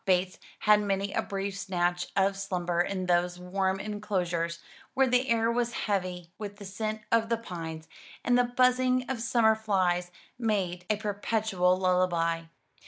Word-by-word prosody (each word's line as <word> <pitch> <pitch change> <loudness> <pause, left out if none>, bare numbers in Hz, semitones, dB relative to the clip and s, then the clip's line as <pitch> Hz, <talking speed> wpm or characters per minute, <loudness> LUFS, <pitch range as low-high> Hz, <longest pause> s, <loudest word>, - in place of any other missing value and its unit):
Bates 185 0 +1 0.2
had 210 -1 +6
many 200 0 -1
a - - +1
brief 195 0 -4
snatch 175 -2 -1
of 195 0 +3
slumber 180 -3 -1
in 185 +1 -2
those 175 0 +1
warm 190 +1 -1
enclosures, 180 -5 -2 0.4
where 270 - +5
the 250 +1 +2
air 230 0 +3
was 240 0 0
heavy 180 -4 -2
with 205 -1 -6
the 205 - -10
scent 215 +3 -3
of 230 0 +3
the 230 - +2
pines, 165 -7 -7 0.4
and 245 - +4
the 245 - +5
buzzing 255 +1 +2
of 260 -4 -3
summer 230 -1 +4
flies 185 -5 0 0.3
made 190 -6 -1
a 215 - +3
perpetual 205 -3 +1
lullaby. 175 -3 +1
195 Hz, 155 wpm, -29 LUFS, 180-220 Hz, 0.4 s, had